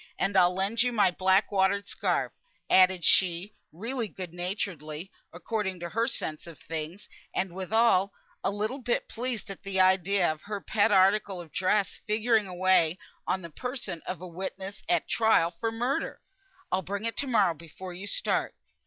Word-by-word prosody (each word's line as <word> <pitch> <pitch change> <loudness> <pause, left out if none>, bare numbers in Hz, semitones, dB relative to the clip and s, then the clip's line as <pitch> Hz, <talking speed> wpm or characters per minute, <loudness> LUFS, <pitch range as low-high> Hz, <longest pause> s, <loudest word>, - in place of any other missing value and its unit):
And 195 0 0
I'll 180 -1 +5
lend 195 +5 +1
you 250 +1 +2
my 205 -6 +3
black 190 +3 +2
watered 200 +1 +2
scarf," - - -1 0.4
added 185 -1 +5
she, 185 +2 +3 0.2
really 230 +7 -3
good 185 -4 -8
naturedly, 175 -3 -4 0.2
according 190 +1 -3
to 170 0 -5
her 230 +5 0
sense 160 -10 -4
of 165 -3 -10
things, 160 +5 -6 0.3
and 185 -2 -1
withal, 195 +1 +2 0.3
a - - +2
little 215 +7 -2
bit 245 -2 -1
pleased 235 -4 -3
at 195 - -9
the 195 -1 -2
idea 185 -1 +4
of 155 0 -8
her 205 -1 -5
pet 210 +2 +2
article 195 0 +3
of 165 -3 -10
dress 190 +3 +1
figuring 215 0 +2
away 180 -2 +3 0.3
on 185 - 0
the 170 - -8
person 250 - -5
of 185 -2 -4
a 185 - -6
witness 190 +3 -6
at 350 - +3
a - - -41
trial 220 -7 +3
for 225 +6 -3
murder. 245 +4 -2 0.5
"I'll 185 - +2
bring 200 +4 -4
it 230 - -1
to 280 - 0
morrow 210 -8 +3
before 170 +3 -10
you 190 +3 -7
start." - - 0
190 Hz, 175 wpm, -28 LUFS, 180-215 Hz, 0.5 s, I'll